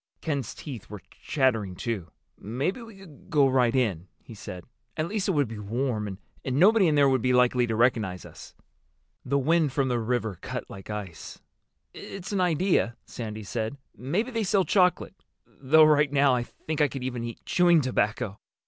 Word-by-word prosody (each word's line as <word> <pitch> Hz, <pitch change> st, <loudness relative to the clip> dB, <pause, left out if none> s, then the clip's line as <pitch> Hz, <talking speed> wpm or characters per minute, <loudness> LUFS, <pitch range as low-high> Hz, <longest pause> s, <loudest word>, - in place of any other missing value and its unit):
Ken's 140 Hz, -7 st, -3 dB
teeth 125 Hz, -10 st, -8 dB
were 105 Hz, -2 st, -9 dB, 0.2 s
chattering, 115 Hz, -, 0 dB
too. 105 Hz, -6 st, -4 dB, 0.3 s
"Maybe 135 Hz, -, -2 dB
we 225 Hz, -2 st, -11 dB
could 175 Hz, -7 st, -16 dB
go 145 Hz, -3 st, +4 dB
right 125 Hz, -2 st, +2 dB
in," 100 Hz, -9 st, 0 dB, 0.2 s
he 115 Hz, -, -11 dB
said. 90 Hz, -4 st, -9 dB, 0.3 s
"At 155 Hz, +1 st, 0 dB
least 205 Hz, 0 st, -2 dB
it 190 Hz, -, +2 dB
would 145 Hz, -4 st, +2 dB
be 110 Hz, -1 st, -7 dB
warm. 105 Hz, -2 st, -2 dB, 0.3 s
And 130 Hz, -, -2 dB
nobody 200 Hz, +1 st, +6 dB
in 155 Hz, -, +2 dB
there 140 Hz, -1 st, +5 dB
would 130 Hz, -2 st, +2 dB
be 125 Hz, +1 st, +2 dB
likely 125 Hz, 0 st, +3 dB
to 110 Hz, -, -1 dB
recognize 110 Hz, -6 st, +1 dB
us." -, -, -13 dB, 0.7 s
The 140 Hz, +2 st, 0 dB
wind 155 Hz, 0 st, +2 dB
from 135 Hz, -2 st, +1 dB
the 120 Hz, -1 st, 0 dB
river 110 Hz, -4 st, -2 dB
cut -, -, -5 dB
like 95 Hz, +1 st, -10 dB
ice. 100 Hz, -6 st, -7 dB, 0.5 s
"It's 195 Hz, 0 st, -8 dB
an 200 Hz, -2 st, 0 dB
idea," 175 Hz, -7 st, +1 dB
Sandy 110 Hz, -2 st, -6 dB
said. 110 Hz, +5 st, -4 dB, 0.2 s
"Maybe 190 Hz, -, -2 dB
they 230 Hz, -2 st, -1 dB
sell 195 Hz, -1 st, +2 dB
chocolate. 180 Hz, 0 st, +1 dB, 0.2 s
Though 155 Hz, +4 st, +4 dB
right 150 Hz, -2 st, +4 dB
now 140 Hz, -2 st, +4 dB
I 125 Hz, -, +1 dB
think 155 Hz, +4 st, -5 dB
I 150 Hz, -, +5 dB
could 135 Hz, -2 st, -6 dB
even 125 Hz, -2 st, -3 dB
eat 115 Hz, -1 st, -7 dB
chewing 175 Hz, -2 st, +4 dB
tobacco." 110 Hz, -5 st, -1 dB
130 Hz, 185 wpm, -27 LUFS, 110-155 Hz, 0.7 s, nobody